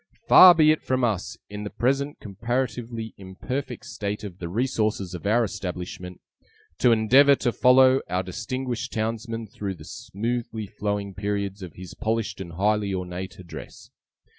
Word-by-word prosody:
Far 180 -1 +10
be 155 -1 +6
it 155 - 0
from 130 -1 -1
us, 105 -6 -1
in 105 0 -7
the 105 - -4
present 135 +6 -1
comparatively 115 +1 -3
imperfect 100 +9 -5
state 105 -5 -4
of 95 -3 -8
the 85 - -5
resources 110 -4 -1
of 90 +3 -5
our 115 +3 +3
establishment, 90 -3 -6 0.6
to 125 - +5
endeavour 130 +6 +6
to 125 -2 0
follow 130 +2 +5
our 90 +1 0
distinguished 125 +6 -4
townsman 115 0 -3
through 100 -2 -5
the - - -13
smoothly 115 +1 -4
flowing 100 0 -3
periods 100 0 -3
of 90 -4 -8
his 90 -1 -9
polished 110 -2 -2
and 85 -3 -8
highly 105 +2 +1
ornate 90 +1 -5
address! 90 -2 -11
110 Hz, 150 wpm, -25 LUFS, 95-125 Hz, 0.6 s, Far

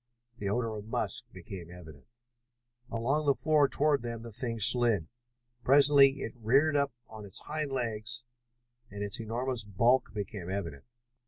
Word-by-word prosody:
The 100 - -2
odor 115 +1 -1
of 105 - -8
musk - - -1
became 90 -4 -9
evident. 80 -5 -13 0.8
Along 135 +7 -1
the 140 - +4
floor 150 -1 +3
toward 145 -2 +2
them 115 -1 -6
the 115 - -8
thing 115 +1 -2
slid. 110 -5 +4 0.6
Presently 140 0 +6
it 115 - -5
reared 135 +7 +3
up 140 -1 +1 0.2
on 110 -1 -10
its 100 -2 -6
hind 150 -2 -4
legs 115 -2 -4 0.7
and 100 0 -6
its 100 +2 -3
enormous 120 +2 -2
bulk 115 +6 +2
became 100 -3 -6
evident. 85 -8 -5
115 Hz, 150 wpm, -30 LUFS, 105-135 Hz, 0.8 s, Presently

